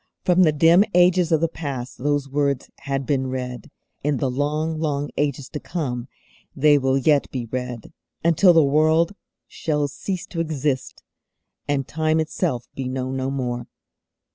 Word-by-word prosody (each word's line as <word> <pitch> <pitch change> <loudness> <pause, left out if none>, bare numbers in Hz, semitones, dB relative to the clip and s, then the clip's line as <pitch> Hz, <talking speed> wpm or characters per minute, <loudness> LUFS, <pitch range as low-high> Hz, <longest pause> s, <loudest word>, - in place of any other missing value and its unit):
From 180 0 +4
the 160 -4 +5
dim 165 +5 +5
ages 180 -1 +4
of 160 -1 +3
the 165 - +3
past 140 -6 -6
those 145 +1 0
words 140 -1 -1
had 135 -1 -3
been 130 -2 0
read; 130 +2 -5 0.3
in 145 -1 +1
the 130 +1 -1
long, 150 +4 -1
long 145 -2 -1
ages 140 -2 -1
to 150 - -5
come 130 -9 -4 0.5
they 145 +1 +5
will 135 0 +2
yet 145 +1 +2
be 125 -3 -4
read, 125 -1 -5 0.3
until 170 +3 +5
the 165 -2 +5
World 155 +5 +3 0.3
shall 150 -2 -1
cease 185 +6 -5
to 180 -4 -6
exist, 150 -4 -2 0.6
and 140 -2 0
time 155 0 +1
itself 155 -5 -1
be 130 -1 -4
known 130 0 -3
no 130 0 -1
more. 120 -3 -3
145 Hz, 160 wpm, -23 LUFS, 130-160 Hz, 0.6 s, the